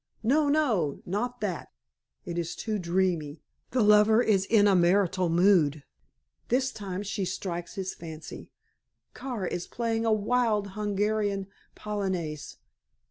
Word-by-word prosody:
No! 285 +6 +3
No! 225 - +1
Not 245 +7 -3
that! 185 -6 -3 0.6
It 175 0 -3
is 170 +1 -3
too 215 -2 -3
dreamy 170 -4 -1 0.3
the 250 -3 +1
lover 210 +1 +6
is 205 -5 +2
in 210 -1 +4
a 200 - +4
martial 180 0 +2
mood. 165 -5 +3 0.6
This 260 +2 +1
time 195 -3 -5
she 205 0 -3
strikes 175 -1 -4
his 190 -2 -3
fancy. 160 -1 -9 0.6
Kara 245 -8 -4
is 175 - -4
playing 230 -1 -1
a - - +3
wild 215 -1 +1
Hungarian 205 0 -1 0.3
polonaise. 185 -8 -4
200 Hz, 130 wpm, -28 LUFS, 175-220 Hz, 0.6 s, lover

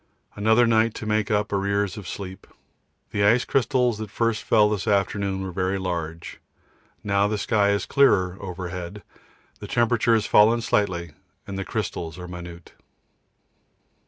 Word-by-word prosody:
Another 110 +3 +4
night 115 -1 +2
to - - -6
make 105 -1 0
up 105 -1 0
arrears 100 0 0
of 100 -4 -8
sleep. 95 -1 -7 0.6
The 100 - 0
ice 115 +4 +4
crystals 125 -3 +1
that 110 -1 -5
first 115 +2 -1
fell 105 -2 +4
this 105 -4 -2
afternoon 100 -1 0
were 95 - -5
very 95 +2 -1
large. 85 -3 -5 0.6
Now 100 0 +2
the 105 0 -1
sky 100 -1 +1
is 100 0 0
clearer 100 -10 +3
overhead, 90 +1 -6 0.6
the 105 - -8
temperature 120 -1 +2
has 110 - 0
fallen 115 +3 +5
slightly, 90 -7 0 0.3
and 100 - -7
the 95 - -3
crystals 85 -7 -4
are 90 0 -8
minute. 85 -1 -10
100 Hz, 150 wpm, -24 LUFS, 95-110 Hz, 0.6 s, fallen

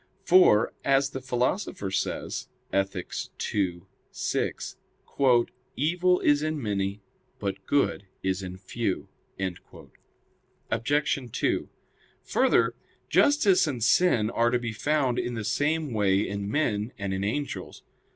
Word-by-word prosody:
For, 180 - +5
as 135 0 +3
the 130 - -5
Philosopher 125 - -1
says - - -2 0.3
(Ethic. 95 -2 -1 0.4
ii, 90 -4 0 0.3
6): - - -2 1.0
"Evil 180 +5 +2
is 145 0 +4
in 155 0 -1
many, 100 -3 -2 0.3
but 100 -1 -4
good 140 -8 +1 0.2
is 95 0 0
in 90 -1 -6
few." 100 +1 -3 1.6
Obj. 130 +1 0
2: - - 0 0.5
Further, - - +3 0.4
justice 235 - +4
and 125 -6 -2
sin 120 -5 +3
are 115 0 +2
to 125 - +2
be 120 -2 -4
found 135 +1 +1
in 120 - -2
the 110 - -3
same 150 +4 0
way 100 -1 +2
in 100 0 -3
men 110 -5 0
and 100 -1 -3
in 95 +1 -2
angels. 140 +8 -4
120 Hz, 120 wpm, -27 LUFS, 100-145 Hz, 1.6 s, For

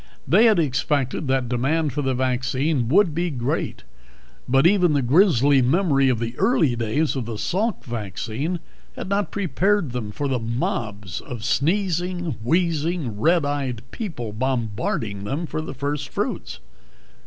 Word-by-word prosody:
They 225 - +5
had 220 -2 +5
expected 140 -1 0
that 130 -2 +1
demand 140 +5 0
for 145 - -1
the 130 -2 0
vaccine 130 +1 0
would 185 +1 +4
be 175 +3 0
great 125 -5 -2 0.7
but 135 +3 +4
even 180 -3 +4
the 140 -2 +2
grisly 140 - +4
memory 140 0 +3
of 125 - +2
the 115 +1 -4
early 175 - +3
days 120 +8 0
of 130 -4 -2
the 115 -1 -5
Salk 205 - -1
vaccine 120 - -3 0.4
had - - -6
not 200 +1 0
prepared 195 -4 0
them 115 -4 -4
for 145 +7 -3
the 130 -2 0
mobs 110 -5 -3
of 120 -3 -7
sneezing, 175 - 0
wheezing 165 - 0
red 165 -1 +3
eyed 135 -5 -2
people 135 - -5
bombarding 110 -4 -2
them 140 +11 -2
for 155 - -3
the 155 - -7
first 140 0 -3
fruits. - - -3
140 Hz, 150 wpm, -23 LUFS, 120-170 Hz, 0.7 s, They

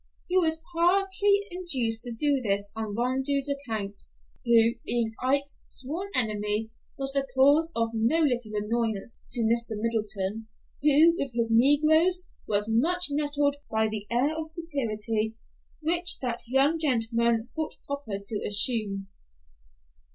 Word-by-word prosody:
He 360 - -2
was 320 -3 +2
partly 390 +4 +2
induced 260 -11 0
to 240 - -4
do 280 +3 +1
this 200 -2 0
on 220 -2 -4
Rondeau's 265 +4 -1
account, 220 -8 -4 0.4
who, 230 -2 +4
being 230 -2 -1
Ike's 280 +2 +1
sworn 325 +10 -4
enemy, 215 -2 0 0.3
was 270 0 -1
the 275 -1 0
cause 290 +5 +4
of 230 0 0
no 230 +7 +1
little 245 -8 0
annoyance 220 0 -2
to 240 - +1
Mr. 230 -1 0
Middleton, 215 -1 -2 0.3
who, 300 +3 +5
with 275 -3 -3
his 230 -1 0
negroes, 315 +8 +4 0.2
was 205 0 +1
much 325 +10 +2
nettled 290 -1 0
by 220 0 +1
the 210 -1 -5
air 260 +6 +1
of 320 0 -5
superiority 225 -9 -2 0.4
which 345 +3 +2
that 240 -2 -3
young 275 +6 +2
gentleman 235 -4 0
thought 315 -1 -4
proper 280 -8 -4
to 210 0 -2
assume. 205 -2 +3
245 Hz, 135 wpm, -26 LUFS, 220-300 Hz, 0.4 s, who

